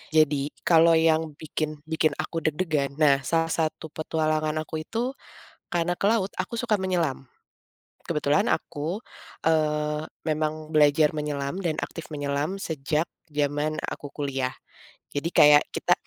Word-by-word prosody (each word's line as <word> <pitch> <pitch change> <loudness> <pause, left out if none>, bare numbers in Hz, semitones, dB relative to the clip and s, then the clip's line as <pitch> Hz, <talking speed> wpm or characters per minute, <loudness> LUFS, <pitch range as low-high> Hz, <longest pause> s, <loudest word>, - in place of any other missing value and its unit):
Jadi, 145 -2 +4 0.2
kalau 165 0 +6
yang 160 -1 +2
bikin 155 0 -4
bikin 160 0 +1
aku 165 - -3
deg-degan, 150 -3 -1
nah, 145 -2 +4
salah 165 0 +1
satu 160 -1 -2
petualangan 155 -1 -1
aku 160 0 -5
itu, 230 +8 -2 0.6
karena 175 +1 +1
ke - - -5
laut 205 -2 +3
aku 205 +5 -3
suka 230 -3 +2
menyelam. 175 -8 -1 0.8
Kebetulan 150 -2 +1
aku, 165 +8 -2 0.4
eee, 150 -1 +1 0.2
memang 155 0 -1
belajar 150 0 +5
menyelam 145 0 -2
dan 155 -2 0
aktif 165 - -6
menyelam 145 +5 -2
sejak 155 0 -1 0.2
zaman 150 +1 0
aku 145 - -7
kuliah. 135 -3 -2 0.6
Jadi 145 +3 -1
kayak 145 0 +7
kita - - +1
155 Hz, 130 wpm, -26 LUFS, 145-165 Hz, 0.8 s, kayak